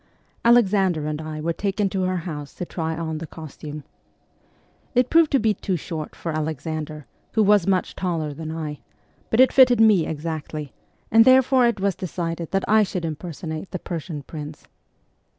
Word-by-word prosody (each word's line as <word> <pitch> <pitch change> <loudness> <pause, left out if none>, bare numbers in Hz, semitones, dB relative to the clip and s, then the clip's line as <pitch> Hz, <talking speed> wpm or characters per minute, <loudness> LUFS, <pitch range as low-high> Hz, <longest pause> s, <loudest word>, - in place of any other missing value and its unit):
Alexander 195 -9 +4
and 155 0 -3
I 155 -1 -6
were 165 +2 -1
taken 200 +2 -1
to 190 0 -2
her 185 0 0
house 150 -5 -6
to 180 - -4
try 160 -2 -3
on 160 -2 -3
the 165 - -6
costume. 150 -1 -9 1.1
It 250 0 +3
proved 330 -2 +5
to - - +6
be 220 -1 +2
too 190 -2 -2
short 160 -2 -6
for 165 - -4
Alexander, 155 -1 -4 0.3
who 220 - +3
was 205 -3 +4
much 190 -2 +1
taller 165 -5 -2
than 155 +2 -6
I, 155 -2 -5 0.5
but 225 - +1
it 260 - +6
fitted 250 -3 +6
me 210 -7 +5
exactly, 155 -2 -5 0.4
and 225 +1 +7
therefore 260 0 +5
it 235 -3 -1
was 195 0 +1
decided 170 -3 -4
that 195 0 -1
I 220 +1 +5
should 185 -4 -2
impersonate 160 +1 -5
the - - -4
Persian 165 -4 -6
prince. 150 +1 -8
170 Hz, 170 wpm, -23 LUFS, 155-205 Hz, 1.1 s, and